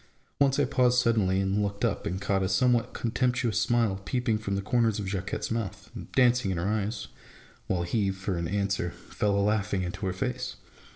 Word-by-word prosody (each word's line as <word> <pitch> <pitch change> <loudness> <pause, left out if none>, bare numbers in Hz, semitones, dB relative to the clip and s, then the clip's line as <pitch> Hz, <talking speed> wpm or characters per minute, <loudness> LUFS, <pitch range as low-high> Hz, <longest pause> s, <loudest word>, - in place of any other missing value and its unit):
Once 140 -1 +4
I 145 - +3
paused 125 -2 +3
suddenly, 110 -6 +2
and 95 +1 +1
looked 100 0 -1
up, - - -1
and 95 +2 -2
caught 100 -1 0
a 95 - 0
somewhat 120 +4 +2
contemptuous 125 -1 0
smile 115 -6 +1
peeping 120 -2 0
from 100 -2 -2
the 100 - -1
corners 115 -1 +2
of 105 - -3
Jacquette's 95 +2 -3
mouth 115 -4 -4
and - - -9
dancing 125 -4 +4
in 95 - -1
her 85 +3 -1
eyes; 105 +2 -1 0.6
while 90 -2 0
he, 100 +3 0
for 95 0 -3
an 85 -1 -2
answer, 100 -2 0
fell 100 +3 -2
a 100 +1 +3
Iaughing 100 -2 -1
into 90 +3 -4
her - - 0
face. 125 +5 -3
105 Hz, 195 wpm, -28 LUFS, 95-120 Hz, 0.6 s, Once